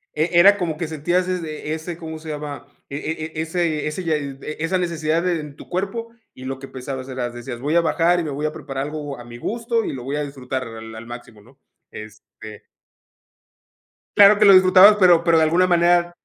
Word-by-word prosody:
e 155 +3 0
era 200 +3 +7
como 170 -5 -2
que 160 +1 -4
sentías 175 +4 -1
es 180 -2 -2
e 155 -1 -5
ese, 160 +1 -7
¿cómo 160 -2 -7
se 155 0 -10
llama? 145 -3 -6 0.2
E 140 - -5
e 160 +1 -4
ese 165 -2 -1
ese 150 +5 -4
ya 160 -2 0
e 140 +1 -6
esa 170 +4 0
necesidad 165 -2 -1
en 150 -5 -4
tu - - -14
cuerpo, 200 +6 -3 0.3
y 130 - -11
lo 135 0 -4
que 135 +1 -10
pensabas 130 0 -7
era 125 -2 -3
decías: 120 0 -8
"Voy 145 +6 -1
a 170 - +5
bajar 170 +1 +2
y - - -2
me 155 - -4
voy 145 +2 -2
a - - -3
preparar 135 -2 -5
algo 150 -2 -6
a - - -9
mi 120 0 -11
gusto 230 - -2
y - - -4
lo 130 -2 -7
voy 135 +3 -4
a 150 - -1
disfrutar 130 -2 -5
al 110 0 -10
al 110 +1 -9
máximo", 120 -2 -11
¿no? 130 +6 -22 0.3
Este 110 0 -12 1.5
claro 205 +1 +7
que 210 - +5
lo 200 - +8
disfrutabas, 185 +2 +7
pero 175 -3 +5
pero 170 -1 +4
de 160 - +4
alguna 170 +4 +3
manera 175 0 +3
155 Hz, 220 wpm, -21 LUFS, 135-175 Hz, 1.5 s, lo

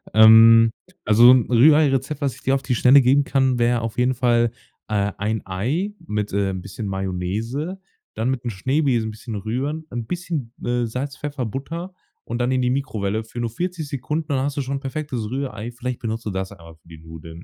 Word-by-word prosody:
Ähm, 115 +1 +8 0.3
also, 115 +4 +7
'n 130 -3 +4
Rühreirezept, 140 +2 +4
was 135 -4 -1
ich 130 - -16
dir 135 - +1
auf 135 - -2
die 130 -2 -1
Schnelle 130 +4 +6
geben 135 +3 +4
kann, 130 -2 +1
wär 120 0 +2
auf 115 -1 -5
jeden 125 +1 +2
Fall, 120 -2 +2 0.4
äh, 100 -1 0
1 110 +2 -2
Ei 135 - -2
mit, 105 -7 -3
äh, 100 -1 +1
'n 95 -1 -5
bisschen 105 +2 -7
Mayonnaise, 100 - -3 0.3
dann 110 +3 -1
mit 130 -2 -2
'n 120 - -2
Schneebesen 125 +2 0
'n - - -6
bisschen 110 +1 -8
rühren, 130 +10 -3
'n 120 -2 -4
bisschen, 160 -4 -4
äh, 120 0 0
Salz, 135 +5 -5
Pfeffer, 145 -3 -4
Butter 165 - -6 0.3
und 120 +1 -4
dann 125 +1 +1
in 130 0 +1
die 125 - +1
Mikrowelle 110 -6 -2
für 110 +2 -9
nur 120 -1 -1
40 175 +4 -4
Sekunden, 150 +4 -3
dann 135 - +1
hast 145 0 -3
du - - +1
schon 135 +1 -3
'n - - -6
perfektes 135 -5 -4
Rührei. 130 -4 -4
Vielleicht 125 0 -5
benutzt 115 0 -4
du 105 - -2
das 95 +1 -4
einfach 85 -4 -14
für - - -27
die 80 -1 -12
Nudeln. 80 +1 -11
120 Hz, 210 wpm, -22 LUFS, 110-135 Hz, 0.4 s, Ähm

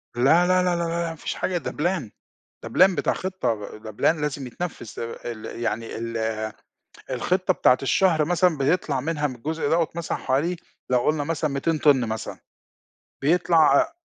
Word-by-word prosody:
لا، 160 +9 +4
لا، 185 0 +3
لا، 180 -1 +1
لا، 170 - -1
لا، - - -1
لا، 170 0 -1
ما 165 - -6
فيش 155 - -5
حاجة 185 - -1
ده 170 - -4
Plan 165 - -1 0.5
ده 115 - -6
Plan 185 +10 +5
بتاع - - +1
خطة 125 - -3
ده 110 0 -9
Plan 155 +9 +1
لازم 145 -3 -3
يتنفّذ، 155 -2 -6
آآ، 115 +1 -5
ال 110 -2 -9
يعني 115 -1 -3
ال 110 -1 -2 0.7
الخطة 185 +9 +1
بتاعة 125 - +4
الشهر 160 +2 +3
مثلًا 175 0 +2
بيطْلع 140 -1 +1
منها 150 +1 -1
من 130 - -5
الجزء 150 +5 -3
دوّة 165 0 +2
مثلًا 170 0 -3
حوالي 150 +7 0 0.3
لو 125 - +4
قُلنا 150 +3 +1
مثلًا 155 0 -1
200 155 +4 0
طِن 140 -4 +4
مثلًا، 110 0 -5 0.8
بيطْلع 170 +4 +3 0.2
ع 325 0 -4
150 Hz, 180 wpm, -24 LUFS, 125-175 Hz, 0.8 s, Plan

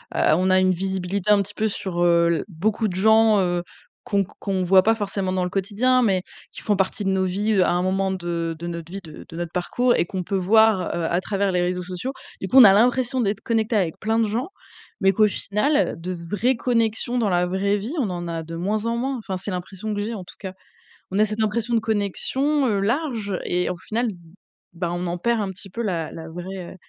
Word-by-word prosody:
heu, - - 0 0.2
on 185 +3 +1
a 185 - +5
une 185 0 +3
visibilité 190 +1 -2
un 205 - +5
petit 205 +2 -9
peu 220 +1 0
sur, 190 -4 -3
heu, 170 -1 +4
l - - -4
beaucoup 210 +5 -1
de 180 - -4
gens, 220 +2 +5
heu, 175 -2 0 0.4
qu'on 200 -1 +1
q 180 - -14
qu'on 190 -2 -1
voit 185 +1 +6
pas 225 +3 +3
forcément 195 -3 -2
dans 185 -1 0
le 180 - -3
quotidien, 220 +7 +2
mais 190 -6 +2 0.3
qui - - -10
font 210 - +2
partie 190 +2 -1
de - - +1
nos 190 0 +1
vies, 205 +4 0
heu, 190 - +4
à - - +1
un 175 +1 +1
moment 190 +1 0
de 170 -3 -3
de 170 - -7
notre 170 -1 -6
vie, 195 +1 -6
de 155 -2 -11
de - - -10
notre 170 0 -4
parcours 240 +8 +1
et - - +2
qu'on 185 +1 -4
peut 195 - -3
voir, 220 +2 +4 0.2
heu, 170 - -2
à 175 +3 0
travers 200 -1 -1
les 180 -1 +1
réseaux 180 +1 -1
sociaux. 185 +9 -5 0.3
Du 190 - -3
coup, 255 - +3
on 260 - +11
a 195 -3 +9
l'impression 245 +4 +2
d'être 205 -1 -1
connecté 225 0 0
avec 180 -6 0
plein 220 +2 0
de 230 - +3
gens, 235 +6 -2 0.5
mais 195 0 +5
qu'au 210 +2 +4
final, 210 +10 0
heu, - - -7
de 175 +2 -5
vraies 205 +9 -1
connexions 230 0 0
dans 220 -4 +1
la 180 -1 +2
vraie 195 +3 0
vie, 225 +10 -5
on 220 -7 0
en 175 -1 -4
a 165 -1 -3
de 165 +1 -8
moins 210 +6 -1
en 235 - 0
moins. 265 +2 -2
Enfin, 195 -4 -4
c'est 195 +2 -5
l'impression 190 +4 -5
que 205 - -3
j'ai, 220 +2 -3
en 190 - -6
tout 180 - -14
cas 190 -2 -6 0.6
on 195 - -1
a 215 - +5
cette 215 +1 -2
impression 230 +2 0
de 225 - +3
connexion, 245 +7 0
heu, 205 -5 +1
large 225 - -1
et 180 0 0
au 180 - -3
final, 230 +7 -2
b 210 - -4 0.6
ben 175 0 -3
on 175 +1 -3
en 175 +1 -3
perd 235 +2 +1
un 195 - -3
petit 195 +1 -9
peu 235 +6 -4
la 175 -7 -2
la 160 0 -8
vraie, 180 +2 -7
195 Hz, 250 wpm, -23 LUFS, 180-220 Hz, 0.6 s, on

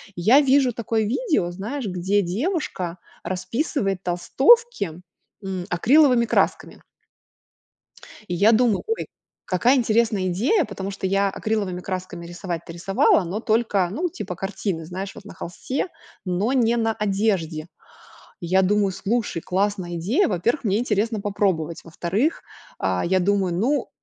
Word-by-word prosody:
Я 225 +12 +5
вижу 270 -3 +3
такое 225 -1 -1
видео, 235 - 0
знаешь, 220 +9 -5
где 190 +2 0
девушка 190 - -2 0.3
расписывает 195 - -2
толстовки, 200 - +2 0.4
м, 185 -2 -4
акриловыми 250 - +4
красками. 220 - 0 1.4
И 175 - -2
я 205 +6 +5
думаю: 225 -3 +3
ой, 450 - -2 0.4
какая 200 +9 +3
интересная 220 -5 +2
идея, 250 - +2
потому 200 -1 -5
что 195 -1 -3
я 195 +1 +2
акриловыми 195 -3 -2
красками 185 -2 -5
рисовать-то 170 -1 -6
рисовала, 195 +2 +3
но 180 +5 -3
только, 220 -5 +1
ну, 345 - -1
типа 195 -10 -6
картины, 190 -2 -3
знаешь, 190 +4 -5
вот - - -12
на - - -10
холсте, 255 - -4 0.4
но 190 +7 0
не 235 -2 +3
на 225 -1 +1
одежде. 195 -7 -1 0.7
И 170 - -5
я 190 +2 +3
думаю: 200 0 +2
слушай, 205 -2 -2
классная 190 -2 -1
идея. 230 - +1
Во-первых, 235 - 0
мне 205 -1 +2
интересно 220 -2 0
попробовать. 190 -6 -1
Во-вторых, 185 - -1 0.4
а, 95 -1 0
я 185 +1 +2
думаю, 190 -1 +1
ну 250 +11 0
200 Hz, 135 wpm, -23 LUFS, 180-235 Hz, 1.4 s, Я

